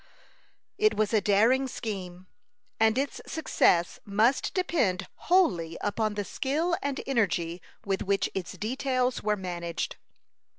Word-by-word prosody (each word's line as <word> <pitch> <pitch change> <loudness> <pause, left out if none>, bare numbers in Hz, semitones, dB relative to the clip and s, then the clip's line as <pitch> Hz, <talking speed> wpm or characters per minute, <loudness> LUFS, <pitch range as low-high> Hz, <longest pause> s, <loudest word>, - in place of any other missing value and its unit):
It 430 0 +4
was 215 0 +1
a 215 - +4
daring 230 +7 +3
scheme, 185 -7 -6 0.5
and 220 +1 +4
its 275 +1 -2
success 175 - +2
must 220 +6 +2
depend 245 - +1 0.2
wholly 175 - +3
upon 215 +1 -1
the 205 -1 -2
skill 310 - 0
and 280 -1 -2
energy 185 -9 0 0.2
with 195 -1 -1
which 195 0 +1
its 185 -2 -4
details 255 +5 -1
were 210 0 0
managed. 175 -3 -4
215 Hz, 125 wpm, -28 LUFS, 185-265 Hz, 0.5 s, It